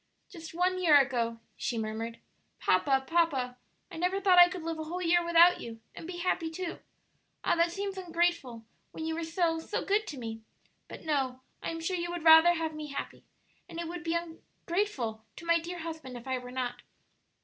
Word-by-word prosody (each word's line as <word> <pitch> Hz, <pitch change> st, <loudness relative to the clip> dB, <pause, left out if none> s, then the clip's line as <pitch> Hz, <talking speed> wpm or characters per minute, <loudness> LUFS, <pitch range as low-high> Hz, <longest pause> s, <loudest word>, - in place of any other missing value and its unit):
"Just 330 Hz, -3 st, -10 dB
one 370 Hz, +1 st, +1 dB
year 310 Hz, -5 st, +7 dB
ago," 235 Hz, -4 st, 0 dB, 0.2 s
she 240 Hz, -, -3 dB
murmured. 225 Hz, +1 st, -4 dB, 0.4 s
"Papa, 265 Hz, +9 st, +2 dB
papa! 275 Hz, -7 st, +1 dB, 0.3 s
I -, -, -8 dB
never 365 Hz, +3 st, 0 dB
thought 375 Hz, -2 st, +5 dB
I 350 Hz, 0 st, +9 dB
could 360 Hz, -2 st, -6 dB
live 325 Hz, -1 st, -3 dB
a 315 Hz, -, -4 dB
whole 350 Hz, +3 st, -4 dB
year 350 Hz, 0 st, +3 dB
without 340 Hz, +1 st, +6 dB
you; 225 Hz, -1 st, -8 dB
and 325 Hz, -, -9 dB
be 355 Hz, -1 st, -6 dB
happy, 345 Hz, -2 st, 0 dB
too! 340 Hz, +2 st, -5 dB, 0.6 s
Ah, -, -, +3 dB
that 335 Hz, 0 st, +2 dB
seems 390 Hz, +1 st, -4 dB
ungrateful, 335 Hz, -10 st, -1 dB, 0.3 s
when 320 Hz, -, -5 dB
you 320 Hz, -, -1 dB
were 330 Hz, +1 st, -3 dB
so, 325 Hz, 0 st, 0 dB
so 320 Hz, -, -3 dB
good 420 Hz, +2 st, +1 dB
to 290 Hz, -, -6 dB
me! 225 Hz, -2 st, -6 dB, 0.5 s
But -, -, -10 dB
no; 265 Hz, -4 st, -1 dB, 0.2 s
I -, -, -3 dB
am 330 Hz, 0 st, -4 dB
sure 365 Hz, +3 st, -1 dB
you 345 Hz, 0 st, -3 dB
would 345 Hz, -2 st, -4 dB
rather 320 Hz, +1 st, +8 dB
have 320 Hz, -1 st, -2 dB
me 305 Hz, 0 st, -6 dB
happy; 280 Hz, -, -6 dB, 0.4 s
and 335 Hz, -, -7 dB
it 340 Hz, -, -3 dB
would 340 Hz, 0 st, -6 dB
be 330 Hz, 0 st, -1 dB
ungrateful 335 Hz, -, -3 dB
to 340 Hz, -, -10 dB
my 335 Hz, 0 st, +4 dB
dear 345 Hz, +2 st, -6 dB
husband 320 Hz, -6 st, -6 dB
if 235 Hz, -, -11 dB
I 260 Hz, -1 st, -1 dB
were 250 Hz, 0 st, -9 dB
not." 245 Hz, -1 st, -3 dB
330 Hz, 205 wpm, -30 LUFS, 260-345 Hz, 0.6 s, I